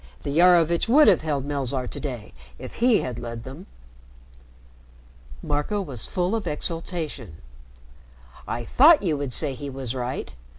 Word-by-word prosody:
The 140 +3 -1
Iarovitch 170 +1 +4
would 300 +5 +6
have 190 -6 +5
held 145 -4 -2
Melzarr 135 -3 -2
to - - -4
day 125 -7 -6 0.2
if - - -10
he 235 -2 +3
had 120 -2 -5
led 115 -1 -7
them." 140 +9 -10 1.8
Marco 150 +8 -1
was 135 - -3
full 180 +2 -1
of 220 - -3
exultation. 155 - -4 1.1
"I 120 - -3
thought 300 - +6
you 165 -5 +1
would 140 -2 -4
say 140 +3 -1
he 140 +2 -7
was 130 -3 -5
right. 125 - -4
145 Hz, 145 wpm, -24 LUFS, 130-180 Hz, 1.8 s, would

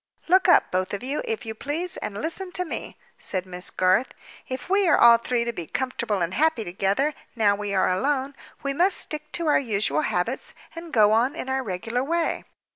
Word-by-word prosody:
"Look 375 +2 +4
up, 350 - +5
both 185 +2 -1
of 200 - -7
you, 275 +4 -2
if 450 - -3
you 220 - -4
please, 305 +10 -4
and 200 - -5
listen 360 - -4
to 360 - -1
me," - - -6 0.2
said 185 -1 -2
Miss 180 0 -6
Garth. 185 +7 +1 0.3
"If 255 -1 -5
we 390 +1 +3
are 330 - +5
all 235 -1 +7
three 235 0 0
to 235 - -2
be 170 -6 -6
comfortable 220 - -2
and 170 +2 -2
happy 310 -4 +2
together, 195 +10 0 0.2
now 210 -3 +3
we 205 -1 -3
are 190 - +3
alone, 270 +8 0 0.3
we 275 0 -1
must 360 +7 +3
stick 305 0 -1
to 340 - -1
our 300 - +4
usual 200 - 0
habits 255 - -2 0.2
and 335 0 -8
go 215 -6 +5
on 240 +7 +2
in 265 - -5
our 265 0 0
regular 225 +3 -3
way. 335 +3 -1
250 Hz, 205 wpm, -25 LUFS, 200-310 Hz, 0.3 s, all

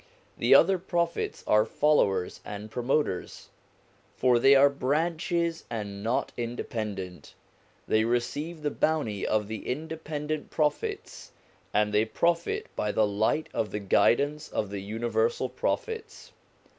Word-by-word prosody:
The - - +5
other 190 +2 +5
Prophets 170 -1 -2
are 105 0 +4
followers 110 -8 +1
and 105 +1 -7
promoters, 125 -4 -1 0.7
for 125 -2 +4
they 135 +3 +6
are 140 +1 +7
branches 165 +4 -1
and 100 -3 -5
not 115 +4 -1
independent; 105 -7 -5 0.5
they 110 0 +3
receive 145 +8 -2
the 150 - 0
Bounty 145 -12 0
of 105 -1 +1
the 110 0 -6
independent 155 +1 -4
Prophets, 150 -2 -2 0.4
and 105 0 +1
they 105 +1 +4
profit 170 +8 0
by 105 - -1
the 110 - +3
light 110 +9 0
of 110 -2 -1
the 105 - -3
Guidance 140 +10 +2
of 105 -2 -2
the 100 -1 -4
universal 120 - -1
Prophets. 450 -1 -4
125 Hz, 125 wpm, -28 LUFS, 105-155 Hz, 0.7 s, are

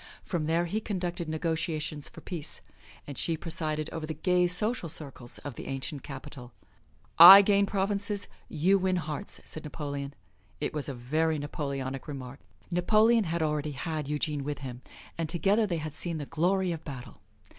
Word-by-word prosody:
From 165 -5 -2
there 165 +2 +2
he 210 +6 -2
conducted 175 -5 -3
negotiations 155 -2 -2
for - - -12
peace 165 -5 -6 0.4
and 145 - -6
she 165 -1 0
presided 155 -2 -1
over 160 -1 -4
the 160 - -4
gay 180 +2 +2
social 210 +1 +1
circles 135 -5 -5
of 145 - -7
the - - -8
ancient 135 +1 -4
capital. 130 -3 -9 0.7
"I 190 +4 +13
gain 200 0 +3
provinces; 200 +1 -1 0.2
you 185 +5 +3
win 185 0 +1
hearts," 155 -4 -4
said 155 - -7
Napoleon. 145 -2 -5 0.4
It - - -2
was 150 -2 -3
a 135 - -4
very 155 +6 0
Napoleonic 140 -2 -4
remark. 135 -2 -7 0.3
Napoleon 215 +5 +4
had 165 0 -1
already 150 -1 -1
had 155 +2 -3
Eugene 150 -1 -1
with 145 +1 -3
him, 125 -1 -7 0.4
and 165 -2 -1
together 200 +6 +2
they 175 -3 -1
had 155 -1 -5
seen 165 +1 -2
the 145 - -4
glory 180 +4 +1
of 165 -1 -5
battle. 135 -4 -9
160 Hz, 165 wpm, -29 LUFS, 145-180 Hz, 0.7 s, I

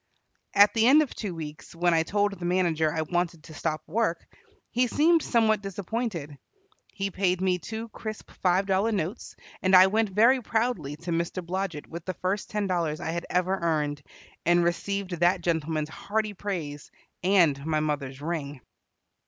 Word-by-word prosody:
At 205 +1 +7
the 225 0 +3
end 300 +4 +7
of 285 - -7
two 195 -6 -5
weeks, 155 0 -8
when 175 0 +2
I 165 - +4
told 205 +5 +1
the 180 - -9
manager 175 -3 +1
I 160 +1 -1
wanted 170 -1 -2
to 160 - -12
stop 155 0 -3
work, 195 -1 -1 0.5
he 250 +1 +2
seemed 320 +6 +4
somewhat 220 -5 +2
disappointed. 195 - -4 0.5
He 195 0 -3
paid 185 -1 +1
me 185 -1 +1
two 220 +6 -6
crisp 215 0 -7
five 185 +1 +3
dollar 195 +3 +1
notes, 195 +1 -3 0.3
and 185 0 +4
I 185 0 +9
went 215 +2 +1
very 230 +7 +4
proudly 220 - -1
to 170 +3 -6
Mr. 170 +2 -2
Blodget 180 -4 -3
with 170 0 -8
the 185 - -3
first 190 +2 -2
ten 210 -1 -1
dollars 170 -5 -1
I 165 - -3
had 170 +1 -4
ever 180 +1 +1
earned, 150 -3 0 0.4
and 175 +1 +4
received 195 +3 -1
that 175 +1 +3
gentleman's 160 -2 -1
hearty 215 +5 -2
praise, 170 -8 -5 0.3
and 175 -7 +3
my 155 0 0
mother's 145 -3 -3
ring. 150 -4 -3
180 Hz, 170 wpm, -27 LUFS, 160-205 Hz, 0.5 s, I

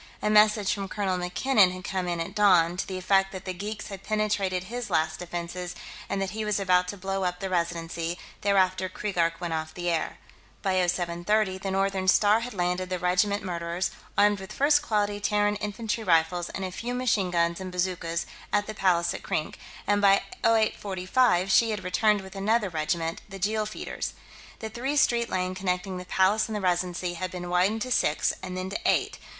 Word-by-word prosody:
A 210 - 0
message 210 -1 +5
from 200 -1 -4
Colonel 190 -2 -1
MacKinnon 190 +3 +3
had 185 0 -7
come 185 0 -2
in 175 -1 -1
at 165 - -4
dawn, 180 -5 +4
to 185 - -3
the 190 - -4
effect 195 +1 +2
that 190 -2 -8
the 185 - -3
geeks 210 +4 -6
had 195 -2 -7
penetrated 200 -3 0
his 240 +4 -5
last 160 -2 0
defenses 175 +1 -5 0.3
and 195 - -1
that 195 -1 -2
he 220 +2 -3
was 210 -1 0
about 180 -2 +3
to 205 - -5
blow 195 +1 -2
up 180 0 -1
the 195 -1 -4
Residency; 170 -1 -2 0.2
thereafter 190 -2 +2
Keegark 175 -4 -1
went 175 -2 -3
off 160 0 -4
the 175 -1 -1
air.... 165 -2 -2 0.5
By 190 -2 +1
0730, 180 +3 0
the 195 - -4
Northern 195 0 0
Star 205 +3 +5
had 240 -1 -6
landed 180 0 -1
the 185 - -1
regiment 180 +3 +1
Murderers, 170 0 -2 0.3
armed 205 0 +4
with 190 0 -9
first 290 +1 +3
quality 205 -6 0
Terran 205 0 +1
infantry 215 +2 -3
rifles 170 -1 +2
and 195 - -4
a 185 - -4
few 240 +6 -4
machine 220 -7 +1
guns 170 0 +1
and 185 -1 -5
bazookas, 175 -2 -2 0.3
at 205 0 +2
the 215 - -6
Palace 175 -4 +2
at - - -6
Krink, 155 - -3 0.3
and 205 0 +2
by 195 -1 +5 0.2
0845 205 -2 +2
she 230 +1 +5
had 210 -3 -3
returned 205 +3 +2
with 190 +1 -11
another 210 +1 +1
regiment, 165 0 -2
the 195 - -7
Jeel 210 +3 0
Feeders. 215 - -5 0.5
The 220 - -4
three 245 +4 -4
lane - - -1
street 235 -3 +3
connecting 185 0 -2
the 180 - -7
Palace 195 +5 +2
and 220 - -3
the 210 - -2
Residency 180 -1 0
had 185 +2 -4
been 175 -1 -6
widened 195 +5 +2
to 255 - -6
six, 155 -9 +2
and 185 -1 -5
then 185 +1 -4
to - - -2
eight.... 360 - +1
190 Hz, 200 wpm, -27 LUFS, 180-210 Hz, 0.5 s, message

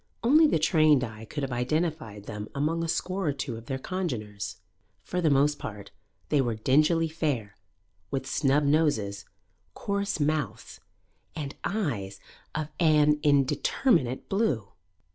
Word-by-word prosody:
Only 305 +7 +6
the - - +2
trained 155 -4 +4
eye 110 -2 -7
could 145 +6 -5
have 135 - -3
identified 125 - -2
them 105 0 -6
among 160 +4 0
a - - -2
score 185 +2 -1
or 145 - +2
two 135 -3 -4
of 115 0 -10
their 135 - -2
congeners. 115 - -4 0.5
For 180 - -2
the 160 - +3
most 145 +1 +3
part, 100 -2 -7 0.4
they 145 -2 +3
were 120 -3 -1
dingily 155 +8 +3
fair, 140 -11 -2 0.5
with 135 -1 -2
snub 140 +2 +2
noses, 140 -10 +1 0.5
coarse 200 -3 -2
mouths, 145 -7 -2 0.6
and 145 -2 -4
eyes 115 - -2 0.4
of 155 0 -2
an 150 -3 +4
indeterminate 145 - +2
blue. 150 - 0
145 Hz, 140 wpm, -27 LUFS, 115-160 Hz, 0.6 s, Only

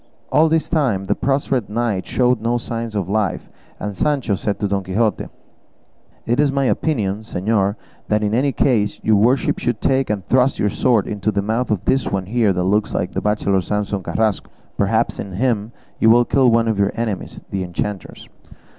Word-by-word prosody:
All 160 +1 +4
this 160 0 +1
time 130 - 0
the - - +1
prostrate 135 -4 -1
knight 110 -3 -1
showed 125 -2 +1
no 120 +2 +1
signs 115 -1 -5
of 100 -4 -1
life, 105 -2 -1 0.3
and 105 -1 -4
Sancho 140 -6 0
said 100 +1 -2
to 105 - 0
Don 100 -1 -1
Quixote, 105 +4 0 1.0
"It 120 +3 0
is 145 -2 +3
my 140 0 0
opinion, 110 -9 0
señor, 100 -1 0 0.3
that 105 0 +1
in 105 0 0
any 135 +4 +2
case 110 -7 +1
your 110 -1 +4
worship 125 +6 +2
should 120 -3 -1
take 135 0 +1
and 100 -3 -2
thrust 130 +1 +3
your 105 - +1
sword 115 -2 +2
into 105 0 -2
the 100 -1 -1
mouth 115 +4 -1
of 105 -5 -1
this 135 0 +1
one 95 -2 -1
here 110 0 +2
that 90 -1 -1
looks 105 +3 0
like 90 - -1
the 95 - -3
bachelor 100 -2 +1
Samson 105 0 -2
Carrasco; 110 +1 -1 0.3
perhaps 110 +3 0
in 100 -2 -6
him 110 0 0 0.3
you 110 - +5
will 120 +2 +6
kill 130 -1 +3
one 115 0 +3
of 110 -3 0
your 100 0 +2
enemies, 115 -5 -4
the 95 - -2
enchanters." 95 +3 -5
110 Hz, 190 wpm, -20 LUFS, 100-120 Hz, 1.0 s, will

